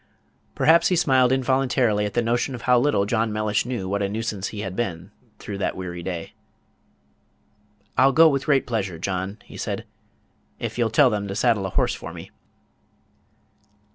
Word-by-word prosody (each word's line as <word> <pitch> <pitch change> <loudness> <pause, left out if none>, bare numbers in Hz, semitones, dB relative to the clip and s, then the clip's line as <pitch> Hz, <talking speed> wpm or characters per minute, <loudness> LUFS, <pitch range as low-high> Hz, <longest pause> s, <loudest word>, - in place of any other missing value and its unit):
Perhaps 165 +1 +4
he 180 - +2
smiled 130 -6 +3
involuntarily 130 -5 +1
at 105 - -9
the 120 - +2
notion 120 +3 0
of 120 - -9
how 125 -1 +4
little 120 -7 +2
John 110 +1 0
Mellish 105 +1 -1
knew 120 -7 -3
what 100 +2 -1
a 100 - 0
nuisance 105 -2 -3
he 105 - -6
had 95 -2 -5
been 95 -4 -4 0.3
through 100 -1 -7
that - - -1
weary 90 -2 -6
day. 85 -2 -5 1.7
"I'll 135 +1 +6
go 160 +5 +7
with 140 -3 0
very 145 -2 +4
great - - -24
pleasure, 100 -7 -2
John," 95 +3 -3
he - - -12
said, - - -4 0.7
"if 115 0 -5
you'll 115 -2 +2
tell 125 +3 +4
them 105 -1 -2
to 95 - -5
saddle 110 -3 +1
a - - -5
horse - - +1
for - - -8
me." - - -10
110 Hz, 180 wpm, -23 LUFS, 100-125 Hz, 1.7 s, go